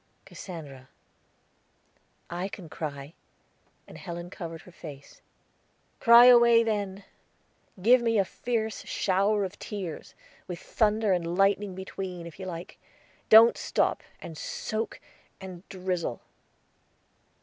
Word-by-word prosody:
"Cassandra." 140 Hz, -8 st, -10 dB, 1.4 s
"I 175 Hz, +2 st, -3 dB
can 185 Hz, -4 st, -10 dB
cry," 145 Hz, -1 st, -6 dB, 0.7 s
and -, -, -12 dB
Helen 175 Hz, 0 st, -7 dB
covered 165 Hz, -4 st, -7 dB
her 180 Hz, -, -15 dB
face. 145 Hz, -5 st, -12 dB, 0.8 s
"Cry 235 Hz, +1 st, +8 dB
away, 235 Hz, -2 st, +7 dB
then. 200 Hz, -3 st, -2 dB, 0.8 s
Give 240 Hz, +6 st, +5 dB
me 230 Hz, -1 st, +1 dB
a 195 Hz, -, +3 dB
fierce 220 Hz, 0 st, -3 dB
shower 200 Hz, +2 st, +1 dB
of 190 Hz, +2 st, -8 dB
tears, 190 Hz, -7 st, -6 dB, 0.3 s
with 175 Hz, -, -5 dB
thunder 215 Hz, 0 st, +1 dB
and 175 Hz, 0 st, -2 dB
lightning 195 Hz, 0 st, +2 dB
between, 185 Hz, -2 st, -6 dB
if 170 Hz, +2 st, -11 dB
you 190 Hz, -, -6 dB
like. 170 Hz, -1 st, -8 dB, 0.5 s
Don't 225 Hz, +2 st, +8 dB
sop, -, -, 0 dB, 0.2 s
and 160 Hz, -2 st, -9 dB
soak, 220 Hz, +1 st, -4 dB, 0.4 s
and 185 Hz, -1 st, -10 dB
drizzle." 180 Hz, -8 st, -3 dB
190 Hz, 115 wpm, -28 LUFS, 170-215 Hz, 1.4 s, Cry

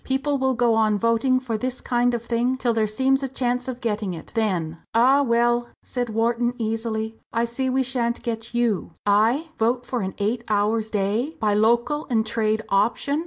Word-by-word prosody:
People 275 Hz, +1 st, 0 dB
will 265 Hz, -1 st, +1 dB
go 235 Hz, -1 st, +3 dB
on 215 Hz, -1 st, +2 dB
voting 230 Hz, +4 st, +2 dB
for 235 Hz, -4 st, -3 dB
this 255 Hz, +2 st, -3 dB
kind 245 Hz, 0 st, +1 dB
of 235 Hz, -, -4 dB
thing, 240 Hz, +2 st, 0 dB
till 245 Hz, -2 st, 0 dB
there 220 Hz, -1 st, +1 dB
seems 265 Hz, +5 st, +1 dB
a 270 Hz, -, -1 dB
chance 250 Hz, -1 st, -2 dB
of 255 Hz, -1 st, -5 dB
getting 210 Hz, -5 st, -2 dB
it. 160 Hz, -, -11 dB
Then!" 180 Hz, -8 st, -1 dB
"Ah, 260 Hz, +5 st, +5 dB
well!" 240 Hz, -1 st, +2 dB, 0.2 s
said 245 Hz, -2 st, -3 dB
Wharton, 235 Hz, +2 st, 0 dB
easily, 225 Hz, -1 st, -3 dB
"I 230 Hz, +1 st, +1 dB
see 260 Hz, +3 st, -2 dB
we 260 Hz, +1 st, +1 dB
shan't 240 Hz, -2 st, -2 dB
get 225 Hz, -1 st, -4 dB
you." 235 Hz, -8 st, -1 dB
"I! 225 Hz, +10 st, +3 dB
vote 240 Hz, +2 st, +1 dB
for 245 Hz, -2 st, -2 dB
an 190 Hz, 0 st, -4 dB
eight 225 Hz, +3 st, -1 dB
hours 215 Hz, +1 st, +1 dB
day, 215 Hz, +9 st, -1 dB
by 210 Hz, -1 st, +1 dB
local 235 Hz, +8 st, +2 dB
and 220 Hz, -3 st, +2 dB
trade 220 Hz, -1 st, 0 dB
option! 235 Hz, +8 st, +1 dB
235 Hz, 190 wpm, -23 LUFS, 220-250 Hz, 0.2 s, Ah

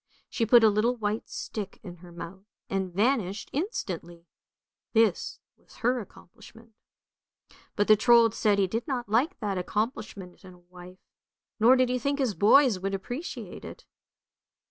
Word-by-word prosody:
She 230 Hz, -, -1 dB
put 235 Hz, 0 st, +6 dB
a 220 Hz, -, +7 dB
little 215 Hz, +4 st, +1 dB
white 215 Hz, -1 st, -3 dB
stick 205 Hz, -3 st, -6 dB
in 180 Hz, -3 st, -9 dB
her 175 Hz, +1 st, -14 dB
mouth 180 Hz, +4 st, -10 dB, 0.2 s
and 190 Hz, -1 st, -2 dB
vanished 205 Hz, -1 st, -1 dB
instantly; 180 Hz, -, -4 dB, 0.7 s
this 220 Hz, -5 st, +1 dB, 0.2 s
was -, -, -21 dB
her 250 Hz, +1 st, 0 dB
accomplishment. 225 Hz, +2 st, -15 dB, 1.0 s
But 205 Hz, -, +1 dB
the 215 Hz, -, +7 dB
Trold 230 Hz, 0 st, +5 dB
said 210 Hz, -3 st, +1 dB
he 200 Hz, -, +3 dB
did 225 Hz, +6 st, -4 dB
not 250 Hz, -4 st, -3 dB
like 255 Hz, -, +1 dB
that 200 Hz, -3 st, -2 dB
accomplishment 205 Hz, -2 st, -4 dB
in 185 Hz, -1 st, -13 dB
a -, -, -20 dB
wife, 180 Hz, +1 st, -14 dB, 0.6 s
nor 235 Hz, +4 st, +6 dB
did 255 Hz, -1 st, +2 dB
he 250 Hz, 0 st, 0 dB
think 280 Hz, +3 st, -1 dB
his 260 Hz, -6 st, 0 dB
boys 225 Hz, +1 st, +4 dB
would 195 Hz, +1 st, -2 dB
appreciate 245 Hz, -, -7 dB
it. -, -, -11 dB
215 Hz, 155 wpm, -27 LUFS, 190-240 Hz, 1.0 s, a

